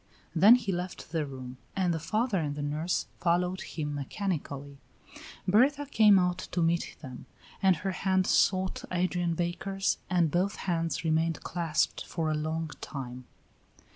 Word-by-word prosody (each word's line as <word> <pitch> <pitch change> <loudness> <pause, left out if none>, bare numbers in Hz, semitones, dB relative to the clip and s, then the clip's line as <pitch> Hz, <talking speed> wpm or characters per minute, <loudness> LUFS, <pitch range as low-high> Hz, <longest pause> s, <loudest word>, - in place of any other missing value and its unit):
Then 220 +5 +8
he 225 -5 -1
left 180 -3 -5
the 160 -3 -1
room, 130 -2 -8 0.2
and 185 -3 +1
the 165 - -2
father 215 +5 0
and 145 -3 -2
the 145 - -4
nurse 155 +4 -1
followed 180 +2 +1
him 150 -2 -4
mechanically. 145 -2 -4 0.7
Berta 270 +9 +4
came 215 -7 +6
out 180 -1 +1
to 180 -2 -2
meet 170 +1 0
them, 130 -3 -9 0.3
and 190 -2 +5
her 190 +5 -3
hand 190 0 +1
sought 185 0 +2
Adrian 175 -1 0
Baker's, 190 +3 -1
and 175 -4 +2
both 190 +5 +1
hands 165 -2 -1
remained 160 0 +1
clasped 165 -3 0
for 160 -2 -2
a - - 0
long 155 +1 -2
time. 130 -3 -6
175 Hz, 150 wpm, -29 LUFS, 155-190 Hz, 0.7 s, Then